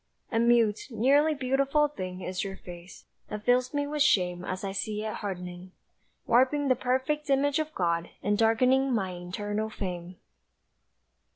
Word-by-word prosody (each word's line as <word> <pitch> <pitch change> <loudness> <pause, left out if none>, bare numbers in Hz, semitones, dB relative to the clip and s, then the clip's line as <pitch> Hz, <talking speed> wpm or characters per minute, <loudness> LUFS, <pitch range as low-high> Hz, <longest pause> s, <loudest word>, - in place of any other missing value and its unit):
A 225 - +1
mute, 230 -3 +3
nearly 280 +7 +3
beautiful 275 +3 +2
thing 185 -10 -6
Is 185 0 -3
your 195 -1 -6
face, 175 0 -12 0.2
that 210 0 -6
fills 250 +1 +3
me 285 -1 -1
with 295 +1 -3
shame 180 -10 +3
As 185 +2 -4
I 195 - -2
see 210 +2 -3
it 215 - -3
hardening, 180 -2 -6 0.5
Warping 265 +4 +3
the 255 - +5
perfect 260 +4 -1
image 280 +2 +2
of 310 0 -3
God, 170 -2 0
And 205 +1 +2
darkening 255 +5 +3
my 190 -4 -1
eternal 205 +5 -4
fame. 180 -4 -5
220 Hz, 155 wpm, -28 LUFS, 185-270 Hz, 0.5 s, the